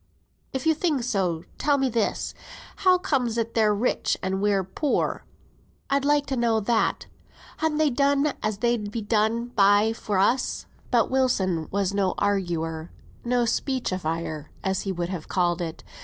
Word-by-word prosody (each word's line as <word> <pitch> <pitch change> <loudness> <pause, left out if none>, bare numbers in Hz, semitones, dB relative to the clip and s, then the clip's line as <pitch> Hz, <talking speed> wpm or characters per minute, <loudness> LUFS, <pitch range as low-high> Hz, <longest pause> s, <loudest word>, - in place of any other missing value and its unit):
"If 265 +2 -4
you 320 - +5
think 310 -5 0
so, 190 -8 -1 0.2
tell 290 -1 +3
me 270 -1 +1
this. 230 -3 -1 0.4
How 370 -2 +4
comes 265 -11 0
it 230 0 -1
they're 215 -2 +3
rich, 210 +4 0
and 190 +1 -1
we're 200 -2 +2
poor? 265 - -1 0.7
I'd 275 0 +2
like 290 0 +3
to 270 - -2
know 235 -2 +2
that. 220 +2 0 0.5
Han 315 -1 0
they 310 -2 +3
done 280 +2 +2
as 215 -1 -1
they'd 235 -1 0
be 220 +1 -4
done 220 +3 +1
by 205 0 +4
for 210 -3 -2
us?" 240 +7 +1 0.2
But 240 -1 +2
Wilson 190 -11 +1
was 200 -1 0
no 195 -2 +1
arguer; 170 -5 -1 0.3
no 245 0 +1
speechifier 170 - -2 0.2
as 190 -1 0
he 195 - -3
would 175 -1 -3
have 180 -5 -5
called 175 -1 +1
it. 165 -2 -5
220 Hz, 160 wpm, -25 LUFS, 190-260 Hz, 0.7 s, you